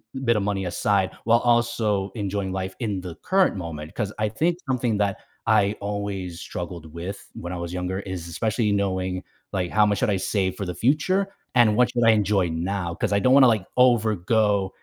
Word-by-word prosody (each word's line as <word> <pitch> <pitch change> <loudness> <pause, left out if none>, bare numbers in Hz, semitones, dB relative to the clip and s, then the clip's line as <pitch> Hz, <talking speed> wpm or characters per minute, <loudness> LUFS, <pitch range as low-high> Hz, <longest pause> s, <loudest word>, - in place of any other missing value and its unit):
m 135 - -5
bit 115 -2 +3
of 100 - 0
money 100 -1 -1
aside 95 +2 +1
while 115 +1 +5
also 120 -5 +1
enjoying 100 -3 -2
life 95 0 -4
in 105 -6 -2
the 90 -2 -7
current 190 - +2
moment, 80 -3 -6
'cause 105 0 -3
I 110 0 +1
think 165 +11 0
something 120 -4 +1
that 100 -2 +1 0.3
I 105 -2 +3
always 100 -4 -4
struggled 85 -2 -6
with 90 +4 -7
when 85 - -7
I 90 - -4
was 85 0 -5
younger 90 +1 -2
is 95 -4 -6
especially 110 +5 0
knowing, 95 -2 -1 0.3
like, 90 -2 -1
how 105 -1 +4
much 105 -1 +1
should - - +1
I 100 - +2
save 95 0 -1
for 100 - -4
the 90 - -4
future 150 - +2 0.3
and 115 -4 +5
what 125 +2 +3
should 120 -2 +1
I 115 - +7
enjoy 105 -3 +2
now 85 +1 -2
'cause - - -2
I 100 - +3
don't 130 +6 +4
wanna, 135 -1 +8
like, 110 -5 +1
overgo 110 -4 +3
100 Hz, 200 wpm, -24 LUFS, 95-115 Hz, 0.3 s, wanna